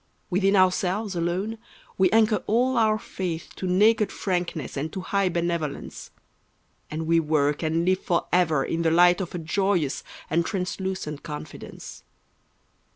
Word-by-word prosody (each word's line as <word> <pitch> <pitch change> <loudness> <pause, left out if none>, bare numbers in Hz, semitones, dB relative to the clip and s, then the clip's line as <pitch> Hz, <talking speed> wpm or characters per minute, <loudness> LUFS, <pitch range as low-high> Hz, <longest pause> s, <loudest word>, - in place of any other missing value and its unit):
Within 195 +2 +3
ourselves 185 +2 +2
alone 185 +6 -2 0.4
we 185 -1 +4
anchor 220 +1 +3
all 250 +4 +2
our 220 -2 +3
faith 180 -6 -5
To 185 - -3
naked 210 +4 +3
frankness 175 -7 -3
and 150 +3 -3
to 190 - -4
high 195 0 0
benevolence; 170 -4 -3 0.8
And 160 +1 -4
we 165 +1 +3
work 150 -2 +1
and 165 +1 0
live 185 +1 +2
forever 170 -4 +1
in 165 - -2
the 165 - +2
light 175 +2 +5
Of 180 -1 -5
a - - -1
joyous 175 -3 0 0.2
and 170 +3 +1
translucent 185 -5 -3
confidence. 150 -2 -9
180 Hz, 140 wpm, -25 LUFS, 165-195 Hz, 0.8 s, light